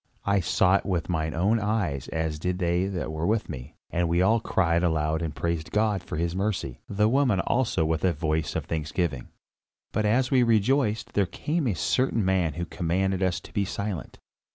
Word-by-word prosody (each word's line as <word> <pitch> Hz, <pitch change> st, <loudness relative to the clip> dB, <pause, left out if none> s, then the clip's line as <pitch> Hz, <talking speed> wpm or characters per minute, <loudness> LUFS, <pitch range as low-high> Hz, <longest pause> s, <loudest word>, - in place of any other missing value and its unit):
I 100 Hz, 0 st, +3 dB
saw 95 Hz, +1 st, +3 dB
it -, -, -6 dB
with 90 Hz, -4 st, -1 dB
mine 80 Hz, -2 st, -1 dB
own 100 Hz, +7 st, +2 dB
eyes 105 Hz, -, -1 dB
as 80 Hz, -1 st, -2 dB
did 90 Hz, +2 st, -1 dB
they 90 Hz, +1 st, +1 dB
that 90 Hz, -5 st, -3 dB
were 80 Hz, +1 st, -2 dB
with 110 Hz, +1 st, +1 dB
me, 65 Hz, +2 st, -8 dB, 0.2 s
and 85 Hz, -1 st, 0 dB
we 85 Hz, +1 st, +2 dB
all 110 Hz, +5 st, +4 dB
cried 85 Hz, -6 st, +1 dB
aloud 80 Hz, -2 st, +1 dB
and 80 Hz, -3 st, -3 dB
praised 80 Hz, +3 st, -2 dB
God 105 Hz, -3 st, +1 dB
for 85 Hz, -, -6 dB
his 85 Hz, +1 st, -1 dB
mercy, 95 Hz, -, -2 dB
the 105 Hz, +1 st, +2 dB
woman 125 Hz, -4 st, +2 dB
also 115 Hz, -10 st, +1 dB
with 80 Hz, 0 st, -1 dB
a 95 Hz, -, +4 dB
voice 80 Hz, -1 st, -1 dB
of -, -, -2 dB
thanksgiving. 80 Hz, -3 st, -2 dB, 0.6 s
But 110 Hz, -, 0 dB
as 125 Hz, +5 st, +2 dB
we 130 Hz, -2 st, +5 dB
rejoiced, 115 Hz, 0 st, +2 dB
there 100 Hz, -3 st, +2 dB
came 155 Hz, -, -2 dB
a 105 Hz, -, 0 dB
certain 115 Hz, -, +1 dB
man 90 Hz, -5 st, +1 dB
who 85 Hz, +1 st, -3 dB
commanded 95 Hz, +3 st, -1 dB
us 90 Hz, -1 st, +1 dB
to -, -, -14 dB
be 100 Hz, -, +1 dB
silent. 100 Hz, -4 st, -4 dB
90 Hz, 200 wpm, -26 LUFS, 80-105 Hz, 0.6 s, we